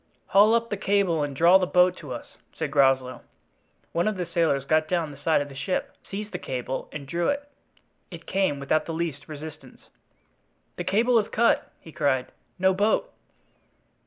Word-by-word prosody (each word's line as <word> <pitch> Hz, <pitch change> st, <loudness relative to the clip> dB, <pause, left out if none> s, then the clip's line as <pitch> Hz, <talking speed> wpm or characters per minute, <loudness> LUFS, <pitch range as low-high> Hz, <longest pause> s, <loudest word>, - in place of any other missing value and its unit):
"Haul 210 Hz, +3 st, +6 dB
up 230 Hz, 0 st, -1 dB
the 205 Hz, -, -1 dB
cable 195 Hz, -5 st, +1 dB
and 145 Hz, -1 st, -3 dB
draw 170 Hz, +6 st, +6 dB
the 185 Hz, -, 0 dB
boat 180 Hz, 0 st, +4 dB
to 145 Hz, -5 st, -9 dB
us," -, -, -8 dB, 0.2 s
said 160 Hz, -3 st, -4 dB
Groslow. 135 Hz, -2 st, +2 dB, 0.7 s
One 170 Hz, +4 st, 0 dB
of 215 Hz, -2 st, -1 dB
the 180 Hz, -, -2 dB
sailors 165 Hz, -5 st, 0 dB
got 155 Hz, +1 st, +2 dB
down 165 Hz, -3 st, -1 dB
the 140 Hz, -, -12 dB
side 160 Hz, 0 st, +2 dB
of 145 Hz, -, -4 dB
the 140 Hz, -, -11 dB
ship, 180 Hz, +7 st, -3 dB
seized 210 Hz, +2 st, -5 dB
the 180 Hz, -, -4 dB
cable, 130 Hz, -2 st, -4 dB
and 140 Hz, -3 st, -7 dB
drew 170 Hz, +3 st, -1 dB
it; 285 Hz, 0 st, -2 dB, 0.6 s
it 170 Hz, -2 st, -10 dB
came 190 Hz, -7 st, 0 dB
without 140 Hz, +3 st, 0 dB
the 165 Hz, -, -3 dB
least 160 Hz, -3 st, -4 dB
resistance. 150 Hz, -3 st, -10 dB, 0.9 s
"The 175 Hz, -, -4 dB
cable 225 Hz, +6 st, +3 dB
is 210 Hz, -, -3 dB
cut!" 235 Hz, +1 st, +2 dB
he 160 Hz, -, -13 dB
cried, 140 Hz, -5 st, 0 dB, 0.3 s
"no 190 Hz, +1 st, +3 dB
boat!" 215 Hz, -, +1 dB
170 Hz, 185 wpm, -25 LUFS, 145-195 Hz, 0.9 s, Haul